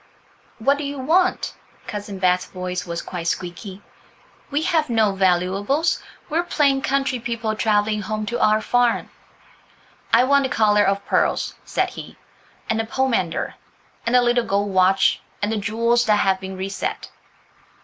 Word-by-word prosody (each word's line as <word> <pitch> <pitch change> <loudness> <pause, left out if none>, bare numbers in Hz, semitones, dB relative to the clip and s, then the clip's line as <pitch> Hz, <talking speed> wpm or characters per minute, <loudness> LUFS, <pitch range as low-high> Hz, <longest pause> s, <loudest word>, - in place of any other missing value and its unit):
"What 275 +6 +2
do - - -3
you 285 0 -4
want?" 335 +8 +1 0.3
Cousin 205 -1 -6
Bet's 180 -1 +2
voice 180 -1 -5
was 170 0 -4
quite 175 -2 -5
squeaky. 185 +3 -4 0.7
"We 295 +2 -1
have 320 -5 +1
no 220 -4 +2
valuables; 195 - +1 0.3
we 325 0 0
are - - +1
plain 280 -5 +2
country 270 -2 0
people, 230 -2 -3
travelling 215 -1 +1
home 215 +1 -3
to 240 +3 -3
our 215 0 +4
farm." 245 0 +1 1.0
"I - - +6
want 280 +2 +4
the - - -2
collar 210 -3 +3
of 200 0 0
pearls," - - +1
said - - -1
he, - - -10 0.5
"and 220 - 0
the 225 - 0
pomander, 230 -9 -1 0.5
and 235 +2 +1
the 250 - +6
little 240 0 +2
gold 200 -1 -1
watch, 190 +1 +3 0.2
and 205 +1 -1
the 225 - -1
jewels 230 +3 +1
that 210 - +5
have 195 -2 +2
been 190 0 -7
reset." 190 +1 -4
215 Hz, 160 wpm, -22 LUFS, 195-250 Hz, 1.0 s, I